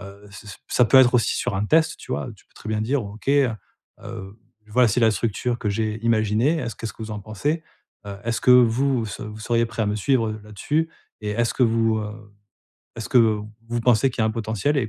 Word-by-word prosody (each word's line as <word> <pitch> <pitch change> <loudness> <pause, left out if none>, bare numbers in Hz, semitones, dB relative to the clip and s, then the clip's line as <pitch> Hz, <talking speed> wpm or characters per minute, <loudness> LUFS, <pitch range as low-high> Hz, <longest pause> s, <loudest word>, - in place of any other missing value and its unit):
Heu, 100 +1 -12
ç 105 +1 -12
ça 95 - -9
ça 125 - +3
peut 135 - +4
être 125 -1 +6
aussi 115 -3 +2
sur - - -2
un 105 +2 -1
test, 160 +3 +3
tu - - -7
vois. 70 0 -2
Tu - - -24
peux - - -36
très 110 - -10
bien 105 0 0
dire: 130 0 0
«OK, 105 +5 -9
heu 140 -3 +4 0.5
heu 95 +3 -8 0.3
voilà, 125 +2 +4
c'est 110 +4 +1
la 115 -1 +5
structure 120 +2 -2
que 105 - -2
j'ai 110 +1 -2
imaginée, 115 +7 +2
est-ce 115 -7 -4
qu'est-ce 115 - -5
que - - -21
vous 110 - -6
en 105 - -5
pensez? 145 +11 -3 0.4
Heu 100 -1 -6
est-ce 115 -1 -1
que - - +4
vous 125 0 +3
se 105 - -7
vous 105 0 -8
seriez 115 +1 +1
prêt 115 0 -6
à - - 0
me 105 - 0
suivre, 115 0 +1
heu, 110 0 -6
là-dessus? 150 +10 -2 0.3
Et 105 - -2
est-ce 115 +2 0
que 130 - +1
vous 115 -1 +2
heu, 105 -1 -8 0.6
est-ce 115 - -6
que 125 - +5 0.5
vous 120 0 -1
pensez 120 +2 +3
qu'il 115 - -2
y - - +3
a - - +3
un - - +1
potentiel 110 +6 -1
et 115 - -1
115 Hz, 245 wpm, -23 LUFS, 105-125 Hz, 0.6 s, être